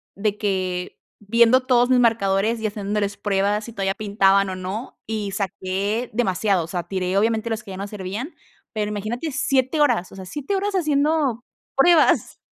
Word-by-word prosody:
de 205 +1 -1
que 185 -3 -2 0.2
viendo 235 +4 +4
todos 245 -1 +3
mis 255 -1 +4
marcadores 225 -1 +2
y 220 - -1
haciéndoles 205 -1 -2
pruebas, 205 +1 0
si 235 - -9
todavía 195 -2 -1
pintaban 200 -2 +2
o - - -4
no, 190 +6 -6
y 210 -2 -3
saqué 200 +3 -2
demasiados. 195 -5 +1
O - - -12
sea, 175 0 -3
tiré 185 0 -1
obviamente 225 +2 +1
los 225 0 -3
que 200 - -10
ya 190 - -7
no 200 +1 -4
servían, 210 - -6 0.4
pero 210 -1 -1
imagínate 215 +9 -3
7, 265 +2 +1
o - - +7 0.3
sea, 190 -1 -8
7, 295 - -4 0.2
haciendo 295 -6 +1 0.3
pruebas. 320 +3 +4
210 Hz, 165 wpm, -22 LUFS, 195-240 Hz, 0.4 s, o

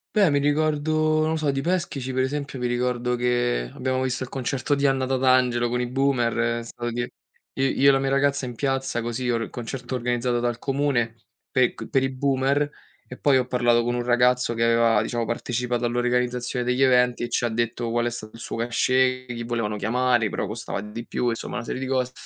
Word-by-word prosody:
Beh, 200 -6 +5
mi 145 0 +2
ricordo, 155 +1 +1
non 155 - +1
lo 160 - 0
so, 150 -2 +1
di 135 0 -2
Peschici, 165 -7 -2
per 130 0 +1
esempio, 140 -1 -3
mi 125 - 0
ricordo 125 0 0
che 120 - 0
abbiamo 130 0 -1
visto 130 0 -1
il 125 - -7
concerto 135 +2 -1
di 140 0 0
Anna 135 -1 +2
Tatangelo 130 -2 +2
con 125 +1 -1
i 125 - -1
boomer. 120 -3 +1
È - - -7
stato 120 0 -5
di 120 +1 -2 0.5
i 135 - -1 0.2
io 140 - +5
e - - +9
la 135 - +3
mia 135 0 0
ragazza, 140 0 +1
in 125 - -5
piazza, 135 -2 -1
così, 120 +2 -3
or 115 -1 +1
il - - -7
concerto 125 +1 -5
organizzato 120 0 0
dal 120 0 -1
comune, 135 -5 0 0.3
pe 130 -2 +2
ch - - -7
per 135 -2 +2
i 135 - +1
boomer, 140 +2 +1 0.4
e - - -9
poi 140 -2 +4
ho 125 - +1
parlato 120 -2 +2
con 120 - 0
un 120 - -1
ragazzo 125 0 +2
che 115 0 +1
aveva, 115 -2 +4
diciamo, 120 +1 -2
partecipato 120 +1 -2
all'organizzazione 125 +1 0
degli 125 +2 +2
eventi 125 -2 +3
e 120 - -3
ci 120 - 0
ha 120 - +1
detto 115 +1 -2
qual 120 +1 0
è - - +1
stato 110 -2 -8
il 115 - -11
suo - - -5
cachet, 130 +2 +1
chi 115 0 -5
volevano 115 -3 -2
chiamare, 120 +2 +2
però - - -2
costava - - -5
di 110 +3 -7
più, 120 - 0
insomma, 115 +1 -4
una 120 - -3
serie 130 - -4
di 130 - -3
cose. 130 -1 0
125 Hz, 220 wpm, -24 LUFS, 120-135 Hz, 0.5 s, e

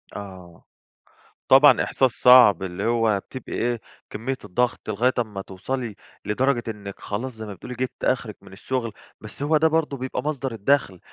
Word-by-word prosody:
آه، 95 -4 -10 0.9
طبعًا 135 +3 +7
إحساس 130 -2 +1
صعب 110 -7 +6
اللي 90 +2 -4
هو 115 -3 +2
بتبقى 130 +5 -10
إيه، 120 -1 -1 0.3
كمية 125 +5 -4
الضغط 120 +3 -1
لغاية 120 +5 +1
أمّا 105 -4 -3
توصلي 110 +4 -5 0.3
لدرجة 120 +3 +1
إنِك 100 -3 -7
خلاص، 125 +6 -4
زي 110 -1 -8
ما 105 - -7
بتقولي 125 +7 -9
جبتِ 130 +1 -5
آخرِك 120 -5 -1
من 100 -1 -15
الشغل، 115 +2 -3 0.3
بس 110 +6 -8
هو 155 +2 +3
ده 160 +2 +4
برضه 160 -3 0
بيبقى 130 0 -4
مصدر 140 -3 -3
الدخل. 110 -4 0
115 Hz, 160 wpm, -23 LUFS, 100-130 Hz, 0.9 s, طبعًا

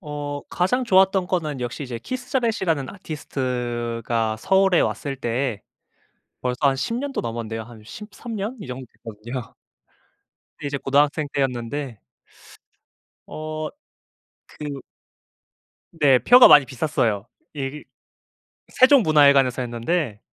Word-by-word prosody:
어 145 -3 -5
가장 250 +9 0
좋았던 190 -3 +4
거는 155 -7 -2
역시 120 +4 -4
이제 125 -3 -6
키스 250 - -6
자렛이라는 190 - 0
아티스트가 120 - -3
서울에 190 - +3
왔을 140 -2 -2
때 120 -3 -2 0.8
벌써 125 -1 -2
한 140 -2 +3
10 140 +12 -2
년도 275 +3 -3
넘었는데요. 115 -1 -4
한 115 -1 -14
13 210 - -9
년 210 +6 -4
이 - - -8
정도 130 +1 -7 0.2
됐거든요. 115 +3 -7 1.0
그때 - - -6
이제 140 0 -2
고등학생 145 +2 +1
때였는데 130 -1 -2 1.3
어 155 0 -5 0.8
그 145 -2 -7 1.2
네. 135 -3 +6
표가 245 - +8
많이 145 -2 +8
비쌌어요. 120 -5 -1 0.3
예 140 +1 -5 0.8
그 - - -20
세종문화회관에서 145 - +5
했는데 120 +1 -2
140 Hz, 250 characters per minute, -23 LUFS, 120-175 Hz, 1.3 s, 표가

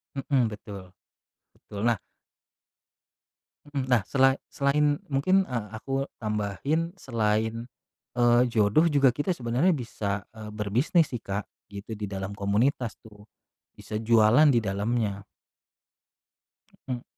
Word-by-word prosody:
Mhm, 135 -2 +1
betul, 100 -3 -9 0.6
betul, 100 - -10
nah 115 - +3 1.7
Mhm, 140 -3 -2
nah, 125 -4 +3
sela 135 -1 +4 0.2
selain 145 +1 +2
mungkin, 185 +8 +2
eee, 115 -4 -4
aku 135 +3 -2 0.2
tambahin 105 - -1
selain, 110 -1 -1 0.6
eee, 120 0 +5
jodoh 115 +10 +3
juga 140 -4 +4
kita 145 +8 -2
sebenarnya 130 +3 +1
bisa, 105 - -3
eee, 110 -1 -8
berbisnis 115 - +1
sih 120 - -4
Kak 100 +1 -4 0.2
gitu 100 +2 -7
di 105 -1 -6
dalam 95 +1 -5
komunitas 105 +3 0
tuh, 105 -2 -16 0.6
bisa - - -9
jualan 115 +6 +5
di 125 - +4
dalamnya. 105 0 -1 1.7
Mhm. 125 -2 -3
115 Hz, 115 wpm, -27 LUFS, 105-135 Hz, 1.7 s, eee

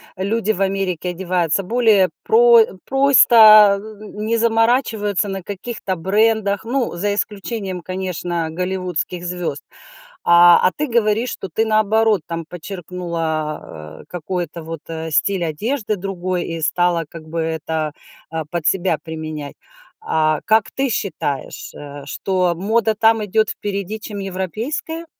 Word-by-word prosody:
люди 215 +3 0
в 195 - -5
Америке 190 -3 -1
одеваются 180 -1 0
более 215 -3 +3
про 235 +1 +6
э, 220 - +3 0.2
просто, 225 -7 +7
э, 215 0 -11
э, - - -9
не 220 +2 0
заморачиваются 225 -3 +1
на 195 -1 -5
каких-то 200 0 -5
брендах, 205 +2 +1
ну, 240 -2 -2
за 200 +4 -1
исключением, 200 -2 -4
конечно, 175 -2 -3
голливудских 180 0 -3
звезд. 175 -5 -4 0.7
А, 175 0 +8
а - - +4
ты 300 - -1
говоришь, 230 0 +1
что 195 - -6
ты, 220 +7 0
наоборот, 215 -1 +2
там 165 -1 -4
подчеркнула, 165 - -5
э, - - -18
какой-то 175 -1 -4
вот, 165 -1 -7
э, 160 0 -5
стиль 190 +4 +1
одежды 215 - -2
другой 185 -2 -3
и 165 0 -5
стала 170 +1 +1
как 165 +1 -10
бы 165 +1 -3
это, 160 -1 -2 0.4
а, 160 -1 -3
под 155 +1 -4
себя 180 -4 +1
применять. 155 -3 -6 0.5
А. 155 - +1
Как 220 0 +2
ты 270 -1 -1
считаешь, 170 - -3
э, 145 -1 -9
что 180 +4 0
мода 220 +5 +1
там 220 0 +3
идет 215 +1 +1
впереди, 200 +1 -4
чем 210 -1 -7
европейская? 215 - -4
190 Hz, 140 wpm, -19 LUFS, 170-220 Hz, 0.7 s, А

